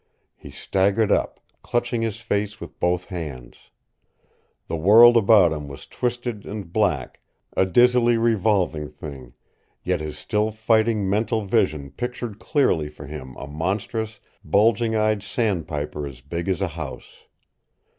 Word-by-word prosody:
He - - -13
staggered 100 +3 +1
up, - - 0 0.2
clutching 120 -1 -1
his 115 -1 -3
face 105 -2 -2
with - - -10
both 90 +1 0
hands. 75 -10 -8 1.0
The - - -3
world 110 +9 +7
about 100 -6 +5
him 75 -2 -6
was 70 -1 -10
twisted 120 -3 -3
and 100 -5 -7
black, 90 - 0 0.4
a 95 - +3
dizzily 120 +3 +4
revolving 100 -9 +1
thing 70 -5 -10 0.5
yet 90 -3 -1
his 75 -1 -6
still 105 +1 0
fighting 110 -1 +1
mental 110 +2 0
vision 85 - 0
pictured 120 -3 -5
clearly 90 - +1
for 75 -1 -11
him 70 -3 -8
a - - -7
monstrous, 100 - -3 0.2
bulging 110 +6 +2
eyed 110 -1 +1
sandpiper 80 - -2
as 65 -3 -11
big 85 +6 -4
as 95 -1 0
a 95 - 0
house. 80 -4 -9
100 Hz, 135 wpm, -23 LUFS, 80-110 Hz, 1.0 s, world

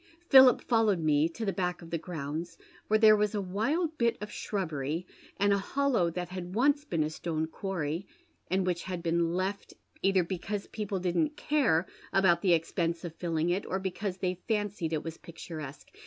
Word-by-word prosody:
Philip 265 -2 +8
followed 225 -5 +3
me 155 -1 +2
to 220 +7 -5
the 195 - 0
back 180 -1 -2
of 165 - -12
the 165 - -1
grounds, 165 0 -5 0.3
where 215 - +4
there 215 -1 +7
was 210 0 0
a - - +1
wild 280 - -1
bit 235 -1 +2
of 210 0 -6
slirubbery 165 -4 -3 0.3
and 200 0 +3
a 200 - +2
hollow 240 -4 +1
that 175 +1 -4
had 180 0 -6
once 285 +5 +3
been 165 - 0
a 150 - -1
stone 160 0 -2
quarry, 165 0 -3 0.4
and 185 0 +1
which 175 -2 0
had 180 -2 -5
been 170 0 +1
left, 190 +2 -3 0.3
either 195 -2 +3
because 195 +3 -4
people 210 -3 -4
didn't 240 - 0
care 260 - +2 0.3
about 190 -3 +4
the 185 -3 +4
expense 165 +1 -1
of 170 - -6
filling 165 0 -1
it, 190 +3 0
or 190 - -1
because 190 0 -3
they 185 -1 -2
fancied 205 -7 -1
it 155 -2 -1
was 165 0 -6
picturesque. 155 -4 -9
185 Hz, 185 wpm, -30 LUFS, 165-205 Hz, 0.4 s, Philip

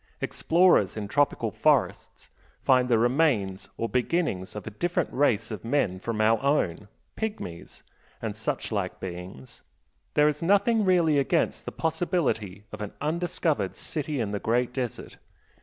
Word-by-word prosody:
Explorers 170 - +3
in 105 -1 -3
tropical 145 +7 +1
forests - - 0 0.3
find 130 -1 +4
the 115 - +4
remains 120 -6 +1
or 115 - -1
beginnings 125 - -1
of 105 - -6
a 110 - -6
different 175 - -1
race 115 -6 +1
of 110 - -6
men 115 -7 0
from 115 +2 -3
our 110 +1 +3
own 120 - 0 0.3
pygmies, 210 - -6 0.4
and - - -4
such - - -3
like - - -2
beings 90 -7 -8 0.5
there 150 0 +5
is 150 -1 -1
nothing 205 +5 +3
really 170 -6 +4
against 160 +4 0
the - - -4
possibility 160 - -1
of 110 - -8
an 105 - -5
undiscovered 155 - -1
City 150 -2 -4
in 110 -4 -1
the 105 - -2
Great 120 +3 0
Desert. 125 -3 -5
125 Hz, 145 wpm, -27 LUFS, 105-160 Hz, 0.5 s, there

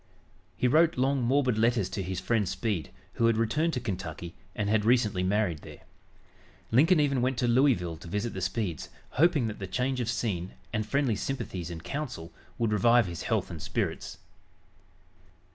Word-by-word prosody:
He 125 - +2
wrote 160 +4 +4
long, 135 +1 +2
morbid 125 -2 +2
letters 115 -4 +2
to 100 - -3
his 95 0 -3
friend 110 -4 0
Speed, 105 -8 -2 0.2
who 115 - +2
had 115 -1 +3
returned 150 +9 +1
to 125 - -1
Kentucky, 90 -6 -5 0.2
and 105 - -1
had 105 0 +2
recently 110 -5 +3
married 95 -3 +1
there. - - -12 0.9
Lincoln 155 +9 +5
even 140 -4 +2
went 130 0 0
to 120 - +1
Louisville 120 - +2
to 85 - -12
visit 105 +6 -2
the 95 - -5
Speeds, 95 - -2 0.2
hoping 150 -3 +3
that 110 -2 -4
the 95 - -5
change 125 +6 -1
of 120 -2 -1
scene 95 -6 -2 0.2
and 110 -1 -1
friendly 135 -2 +1
sympathies 95 -8 -4
and 80 -2 -7
counsel 120 - -5 0.2
would 115 -2 +1
revive 115 +3 +5
his 85 -3 -6
health - - -1
and - - -7
spirits. - - -3
115 Hz, 175 wpm, -28 LUFS, 95-125 Hz, 0.9 s, Lincoln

